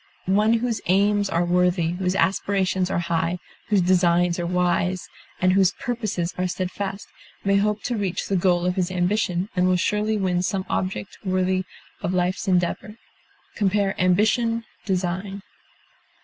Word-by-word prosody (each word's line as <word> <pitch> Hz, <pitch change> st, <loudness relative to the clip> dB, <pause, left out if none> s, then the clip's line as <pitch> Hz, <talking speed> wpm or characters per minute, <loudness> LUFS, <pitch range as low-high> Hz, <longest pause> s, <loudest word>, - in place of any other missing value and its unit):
One 210 Hz, +4 st, +3 dB
whose 230 Hz, -2 st, 0 dB
aims 200 Hz, +2 st, +3 dB
are 175 Hz, -1 st, +1 dB
worthy, 180 Hz, -1 st, +2 dB
whose 180 Hz, +1 st, -1 dB
aspirations 190 Hz, 0 st, +1 dB
are -, -, -1 dB
high, 170 Hz, +1 st, 0 dB, 0.3 s
whose 200 Hz, -4 st, +3 dB
designs 175 Hz, -1 st, +3 dB
are 170 Hz, -, -2 dB
wise, 180 Hz, +1 st, 0 dB, 0.3 s
and 185 Hz, 0 st, +3 dB
whose 190 Hz, -1 st, +4 dB
purposes 215 Hz, -8 st, -3 dB
are 185 Hz, -, +1 dB
steadfast, 190 Hz, +2 st, -4 dB, 0.4 s
may 200 Hz, 0 st, +3 dB
hope 210 Hz, +1 st, 0 dB
to 245 Hz, -, -1 dB
reach 190 Hz, -4 st, -2 dB
the 195 Hz, -, 0 dB
goal 175 Hz, -1 st, +2 dB
of 180 Hz, +1 st, 0 dB
his 180 Hz, -1 st, +1 dB
ambition, 185 Hz, 0 st, 0 dB
and 180 Hz, -1 st, +3 dB
will 185 Hz, -, +3 dB
surely 210 Hz, +4 st, 0 dB
win 185 Hz, -3 st, 0 dB
some 190 Hz, +1 st, -1 dB
object 190 Hz, +1 st, -3 dB
worthy 185 Hz, -1 st, 0 dB, 0.4 s
of 180 Hz, -, -1 dB
a -, -, +2 dB
life's 180 Hz, +4 st, -1 dB
endeavor. 185 Hz, +4 st, 0 dB, 0.6 s
Compare 200 Hz, -1 st, +1 dB
AMBITION; 220 Hz, +5 st, +2 dB, 0.2 s
DESIGN. 190 Hz, +1 st, -2 dB
185 Hz, 150 wpm, -23 LUFS, 180-200 Hz, 0.6 s, whose